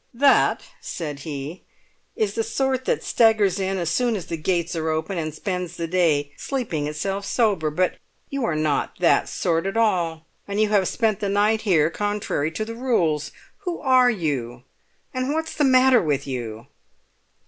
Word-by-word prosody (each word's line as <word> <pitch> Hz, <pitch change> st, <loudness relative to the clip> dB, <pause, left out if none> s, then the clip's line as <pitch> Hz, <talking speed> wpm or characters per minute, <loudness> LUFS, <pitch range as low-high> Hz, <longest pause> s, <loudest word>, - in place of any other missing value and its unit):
"That," 275 Hz, +3 st, +4 dB, 0.2 s
said 150 Hz, -5 st, -5 dB
he, 145 Hz, +3 st, -6 dB, 0.5 s
"is 210 Hz, -2 st, 0 dB
the 225 Hz, -, 0 dB
sort 260 Hz, +3 st, -1 dB
that -, -, 0 dB
staggers 220 Hz, -4 st, +3 dB
in 195 Hz, 0 st, -1 dB
as 170 Hz, -2 st, -1 dB
soon 240 Hz, +4 st, +1 dB
as 185 Hz, -, -4 dB
the 165 Hz, -, -4 dB
gates 170 Hz, +1 st, -1 dB
are 160 Hz, -1 st, -1 dB
open, 160 Hz, +4 st, -2 dB
and 155 Hz, -1 st, -3 dB
spends 180 Hz, +1 st, -4 dB
the 170 Hz, -, -2 dB
day 160 Hz, -5 st, +1 dB
sleeping 200 Hz, -, -2 dB
itself 195 Hz, +7 st, -3 dB
sober. 200 Hz, -9 st, +1 dB
But 180 Hz, +4 st, 0 dB, 0.3 s
you 275 Hz, -2 st, -3 dB
are 170 Hz, -, 0 dB
not 155 Hz, -2 st, 0 dB
that -, -, +3 dB
sort 165 Hz, +2 st, 0 dB
at 195 Hz, -, -2 dB
all, 170 Hz, -8 st, +1 dB, 0.2 s
and 200 Hz, +1 st, -2 dB
you 215 Hz, -1 st, +3 dB
have 200 Hz, -3 st, +3 dB
spent 220 Hz, -4 st, 0 dB
the 200 Hz, -, -1 dB
night 210 Hz, +2 st, +2 dB
here 165 Hz, -7 st, +3 dB
contrary 205 Hz, -7 st, -1 dB
to 215 Hz, +7 st, -4 dB
the 230 Hz, -, -6 dB
rules. 175 Hz, -, 0 dB, 0.3 s
Who 360 Hz, -4 st, -4 dB
are 255 Hz, -2 st, +5 dB
you, 135 Hz, -, -2 dB, 0.5 s
and 255 Hz, +3 st, -1 dB
what's 320 Hz, 0 st, -2 dB
the 300 Hz, -, 0 dB
matter 255 Hz, -1 st, +5 dB
with 145 Hz, -4 st, -1 dB
you?" 120 Hz, -5 st, -5 dB
190 Hz, 175 wpm, -23 LUFS, 155-225 Hz, 0.5 s, are